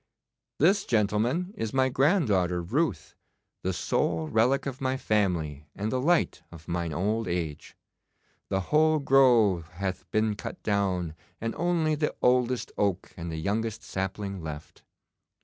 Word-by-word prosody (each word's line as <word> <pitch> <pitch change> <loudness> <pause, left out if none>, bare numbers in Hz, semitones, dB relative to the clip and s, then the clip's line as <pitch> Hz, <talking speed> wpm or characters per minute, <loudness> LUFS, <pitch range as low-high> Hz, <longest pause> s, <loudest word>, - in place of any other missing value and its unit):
This, 190 +7 +4
gentlemen, 115 - +1
is 110 +2 -4
my 130 0 +4
granddaughter 110 - +2
Ruth, 145 - -1 0.5
the - - -1
sole 80 -2 0
relic 120 - +2
of 135 0 -5
my 130 0 0
family 85 - 0
and 105 +2 -2
the 130 - 0
light 170 +5 +2
of 80 -1 -13
mine 85 -1 -2
old 105 +8 -1
age. 85 -4 -4 0.7
The 95 - 0
whole 155 +1 +5
grove 120 - +4
hath 95 0 -4
been 110 +2 +1
cut - - -7
down, 95 -5 0 0.3
and 115 0 -2
only 165 -1 +1
the 150 0 -1
oldest 125 0 +2
oak 100 -3 0
and 85 -1 -6
the 80 - -4
youngest 110 +6 -2
sapling 95 0 -4
left. 80 -1 -8
105 Hz, 140 wpm, -28 LUFS, 90-130 Hz, 0.7 s, whole